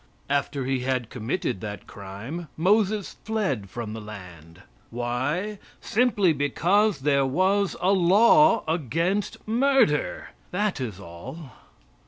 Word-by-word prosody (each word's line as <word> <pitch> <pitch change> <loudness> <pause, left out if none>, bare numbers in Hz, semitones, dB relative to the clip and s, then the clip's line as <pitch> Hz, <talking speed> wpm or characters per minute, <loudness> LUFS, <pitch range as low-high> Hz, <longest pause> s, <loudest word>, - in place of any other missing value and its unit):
After 140 -1 0
he 135 0 0
had 125 -2 -2
committed 115 - -3
that 105 -1 -6
crime 105 - -8
Moses 205 +3 +1
fled 150 - -2
from 110 0 -5
the 110 - -6
land. 90 -4 -11 0.3
Why? 130 - -2 0.2
Simply 210 -7 +2
because 175 +6 +1
there 140 -1 +3
was 190 +7 +1
a 185 - +2
law 225 - +5
against 165 - -1
murder. 280 - +2 0.2
That 195 -5 -1
is 110 -7 -5
all. 100 - -10
155 Hz, 115 wpm, -25 LUFS, -, 0.3 s, law